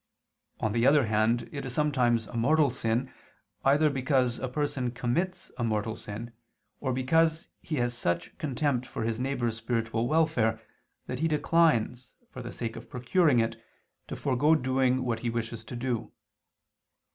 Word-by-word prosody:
On 110 Hz, -, 0 dB
the 115 Hz, +3 st, +2 dB
other 140 Hz, -2 st, +5 dB
hand, 110 Hz, +2 st, +1 dB
it 140 Hz, -, -5 dB
is 125 Hz, -2 st, -3 dB
sometimes 125 Hz, -6 st, +2 dB
a -, -, -11 dB
mortal 140 Hz, +4 st, +3 dB
sin, 120 Hz, +2 st, -1 dB, 0.5 s
either 145 Hz, +3 st, +4 dB
because 130 Hz, -3 st, +1 dB
a 130 Hz, -, -2 dB
person 130 Hz, -2 st, -1 dB
commits 125 Hz, +10 st, -2 dB
a -, -, 0 dB
mortal 110 Hz, -1 st, -1 dB
sin, 115 Hz, +3 st, -7 dB, 0.5 s
or 130 Hz, -, -1 dB
because 160 Hz, +6 st, +2 dB
he 155 Hz, -, -3 dB
has 120 Hz, -2 st, 0 dB
such 85 Hz, -7 st, -2 dB
contempt 140 Hz, -3 st, -1 dB
for -, -, -4 dB
his 115 Hz, 0 st, -1 dB
neighbor's 125 Hz, -4 st, -1 dB
spiritual 115 Hz, 0 st, -1 dB
welfare 130 Hz, -8 st, +2 dB, 0.5 s
that -, -, -4 dB
he 165 Hz, -, +2 dB
declines, 150 Hz, -6 st, +2 dB, 0.2 s
for 130 Hz, -, -7 dB
the 120 Hz, -, -6 dB
sake 115 Hz, -1 st, -4 dB
of -, -, -10 dB
procuring 125 Hz, +2 st, +2 dB
it, 115 Hz, 0 st, -1 dB, 0.4 s
to -, -, -5 dB
forego 145 Hz, +3 st, +3 dB
doing 130 Hz, -2 st, +1 dB
what 115 Hz, -3 st, -1 dB
he 120 Hz, -, -2 dB
wishes 115 Hz, -1 st, -3 dB
to 120 Hz, -, -7 dB
do. 120 Hz, -1 st, -2 dB
125 Hz, 160 wpm, -28 LUFS, 115-140 Hz, 0.5 s, other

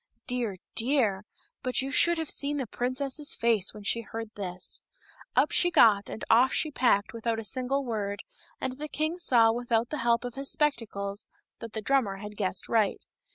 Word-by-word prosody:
Dear, 240 Hz, -6 st, -2 dB, 0.2 s
dear! 225 Hz, -6 st, +1 dB, 0.4 s
but 255 Hz, +1 st, +1 dB
you 270 Hz, -, -4 dB
should 340 Hz, +3 st, +4 dB
have 320 Hz, -2 st, -2 dB
seen 290 Hz, +1 st, 0 dB
the 270 Hz, -, -1 dB
princess's 265 Hz, +5 st, -2 dB
face 225 Hz, -5 st, +1 dB
when 210 Hz, -1 st, -11 dB
she 230 Hz, +3 st, 0 dB
heard 225 Hz, 0 st, -7 dB
this! 185 Hz, -3 st, -5 dB, 0.5 s
Up -, -, +4 dB
she 350 Hz, -, +4 dB
got 210 Hz, -, +5 dB
and -, -, -6 dB
off 245 Hz, +4 st, +5 dB
she 310 Hz, -, 0 dB
packed 235 Hz, -7 st, +2 dB
without 230 Hz, 0 st, -2 dB
a 225 Hz, -, -4 dB
single 260 Hz, +5 st, -2 dB
word, 205 Hz, -4 st, -3 dB, 0.4 s
and 260 Hz, +1 st, -4 dB
the 300 Hz, -, -4 dB
king 310 Hz, +4 st, -2 dB
saw 235 Hz, -9 st, +5 dB
without 235 Hz, 0 st, 0 dB
the 300 Hz, -, -4 dB
help 235 Hz, +1 st, +2 dB
of 245 Hz, -, -5 dB
his 275 Hz, +1 st, -4 dB
spectacles 205 Hz, -9 st, -1 dB, 0.3 s
that 230 Hz, -2 st, -8 dB
the 220 Hz, -, -4 dB
drummer 255 Hz, -6 st, +2 dB
had 210 Hz, +1 st, -8 dB
guessed 190 Hz, -3 st, -2 dB
right. 220 Hz, -3 st, +1 dB
235 Hz, 185 wpm, -28 LUFS, 210-270 Hz, 0.5 s, got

